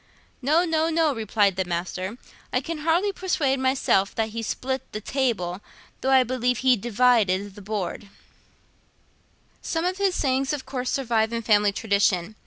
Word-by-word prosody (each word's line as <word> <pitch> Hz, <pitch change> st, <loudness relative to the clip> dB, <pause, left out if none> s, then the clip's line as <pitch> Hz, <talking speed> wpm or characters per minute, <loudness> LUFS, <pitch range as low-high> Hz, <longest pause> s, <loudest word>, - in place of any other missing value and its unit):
"No, 310 Hz, +7 st, +3 dB
no, 320 Hz, -1 st, +1 dB
no," 320 Hz, -2 st, +2 dB
replied 210 Hz, -4 st, +1 dB
the 190 Hz, -, +1 dB
Master; 185 Hz, +4 st, -4 dB, 0.3 s
"I 250 Hz, -, +2 dB
can 325 Hz, +4 st, -5 dB
hardly 335 Hz, +6 st, +1 dB
persuade 315 Hz, -8 st, 0 dB
myself 260 Hz, -7 st, +1 dB
that 225 Hz, -1 st, 0 dB
he 230 Hz, +1 st, -5 dB
split 260 Hz, +4 st, -4 dB
the 215 Hz, -, -3 dB
table, 215 Hz, -7 st, -1 dB, 0.4 s
though 265 Hz, -, 0 dB
I 265 Hz, -1 st, +6 dB
believe 250 Hz, 0 st, 0 dB
he 255 Hz, -1 st, +6 dB
divided 210 Hz, -4 st, +2 dB
the 205 Hz, -, -12 dB
Board."' 205 Hz, -1 st, -4 dB, 1.5 s
Some 325 Hz, +1 st, -2 dB
of 370 Hz, +2 st, -1 dB
his 390 Hz, -2 st, +1 dB
sayings 270 Hz, +1 st, 0 dB
of 280 Hz, -3 st, -4 dB
course 250 Hz, -2 st, -3 dB
survive 230 Hz, -4 st, 0 dB
in 230 Hz, 0 st, -3 dB
family 210 Hz, -2 st, +4 dB
tradition. 200 Hz, -2 st, 0 dB
245 Hz, 160 wpm, -24 LUFS, 205-275 Hz, 1.5 s, I